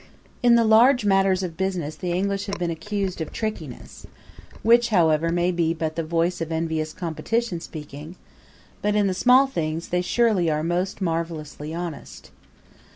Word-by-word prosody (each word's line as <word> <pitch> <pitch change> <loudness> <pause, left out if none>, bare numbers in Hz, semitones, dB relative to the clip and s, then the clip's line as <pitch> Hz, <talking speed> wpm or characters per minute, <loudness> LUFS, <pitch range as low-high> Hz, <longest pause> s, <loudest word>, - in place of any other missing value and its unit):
In 240 -1 +5
the 235 - +4
large 230 +2 +5
matters 195 -1 +3
of 170 -3 -4
business 180 -5 -2
the 175 +3 -4
English 195 +3 -1
have 200 0 -3
been 175 -1 -2
accused 195 +1 -3
of 160 - -4
trickiness, 190 - -6 0.6
which, 235 +1 +5
however, 165 -5 +3
may 175 +1 +1
be 170 -2 0
but 160 -1 -3
the 165 - -1
voice 165 +2 -1
of 165 0 -3
envious 160 -1 -2
competition 185 +4 -2
speaking; 150 0 -9 0.7
but 210 0 0
in 210 -1 +3
the 190 - +1
small 250 +8 +5
things 165 -10 -3
they 180 0 +1
surely 200 -3 +2
are 155 0 0
most 180 +4 -2
marvelously 165 -3 -3
honest. 170 -2 -7
175 Hz, 160 wpm, -24 LUFS, 160-200 Hz, 0.7 s, In